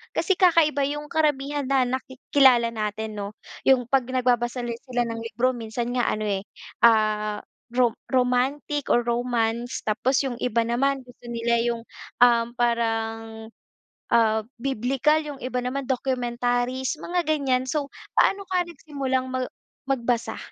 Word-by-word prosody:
kasi 390 - +2
kakaiba 325 -6 +4
yung 295 +1 -4
karamihan 290 -3 0
na 270 -1 +3
naki 260 +1 -4 0.2
kilala 250 -4 +6
natin, 215 0 -3
'no? 205 +1 -5 0.3
Yung 255 -2 +5
'pag 265 -2 +3
nagbabasa 245 -1 0
la 240 - -3 0.2
sila 245 -1 0
ng 230 0 -4
libro, 245 +3 0
minsan 235 0 -4
nga 245 -2 +1
ano 215 - -2
eh, 195 -1 0 0.4
ah, 215 -2 +3 0.2
rom 245 0 +2 0.2
romantic 260 +3 0
or 240 - +3
romance, 235 0 -1
tapos 255 +6 +1
yung 250 -3 -3
iba 235 -1 +1
naman 265 +3 0
gusto 245 -1 -15
nila 235 0 0
yung, 235 -1 -1 0.4
um, 235 -1 +5
parang, 225 -1 -1 0.6
ah, 220 -2 +4 0.2
biblikal, 270 +4 +1
yung 295 -2 -6
iba 255 0 -2
naman 265 +3 -2
documentaries, 250 +1 -1
mga 350 0 -1
ganyan. 275 -5 +1
So, 290 -1 -1 0.3
paano 395 0 +3
ka 365 -1 +2
nagsimulang 275 -6 -3
mag 255 -1 -1 0.4
magbasa, 245 -3 -1
245 Hz, 140 wpm, -25 LUFS, 230-270 Hz, 0.6 s, kilala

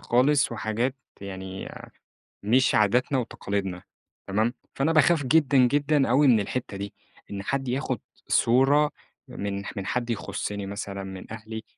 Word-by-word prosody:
خالص 135 +2 +3
وحاجات 110 +3 -1 0.3
يعني 95 -1 -6 0.7
مش 125 +6 +3
عاداتنا 125 +6 +3
وتقاليدنا 100 -6 -3 0.4
تمام؟ 110 +5 +1 0.2
فأنا 145 +4 +1
باخاف 160 0 +4
جدًا، 145 -1 +4
جدًا 140 +3 +3
أوي 140 +4 +5
من 115 -5 +6
الحتّة 105 0 -4
دي، 100 +1 -6 0.4
إن 100 -1 -4
حد 135 +4 -2
ياخُد 130 -2 -1 0.3
صورة 135 +5 +4 0.4
من 100 0 -4
ح - - -7
من 100 -2 -4
حد 120 +2 -1
يخُصِّني 100 -2 -3
مثلًا 100 0 -5
من 95 +2 -8
أهلي، 110 0 -7
115 Hz, 140 wpm, -26 LUFS, 100-135 Hz, 0.7 s, من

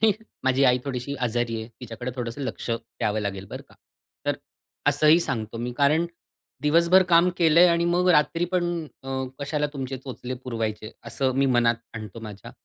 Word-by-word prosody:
की 220 -2 +6 0.3
माझी 130 +1 +3
आई 125 -1 +5
थोडीशी 135 0 -3
आजारी 120 -1 0
आहे. 110 - -7
तिच्याकडे 120 +1 -5
थोडंसं 120 +1 -4
लक्ष 130 -2 -4
द्यावं 115 -2 -2
लागेल 100 -2 -4
बरं - - -6
का. - - -19 0.5
तर - - +1 0.5
असंही 155 +3 +5
सांगतो 110 -7 -3
मी. 120 +1 -3
कारण 150 +4 +3 0.6
दिवसभर 170 +5 +5
काम 170 +2 +7
केलंय 170 +1 +6
आणि 170 0 +2
मग 175 +1 +2
रात्री 165 +1 +3
पण 180 -1 +2 0.4
अ, 135 - -9 0.3
कशाला 145 +1 -1
तुमचे 135 -2 -4
चोचले 130 -1 -6
पुरवायचे, 110 -3 -3
असं 130 +3 0
मी 135 0 +3
मनात 120 -1 +3 0.2
आणतो 110 0 -7
माझ्या. 105 -2 -9
130 Hz, 165 wpm, -25 LUFS, 115-155 Hz, 0.6 s, काम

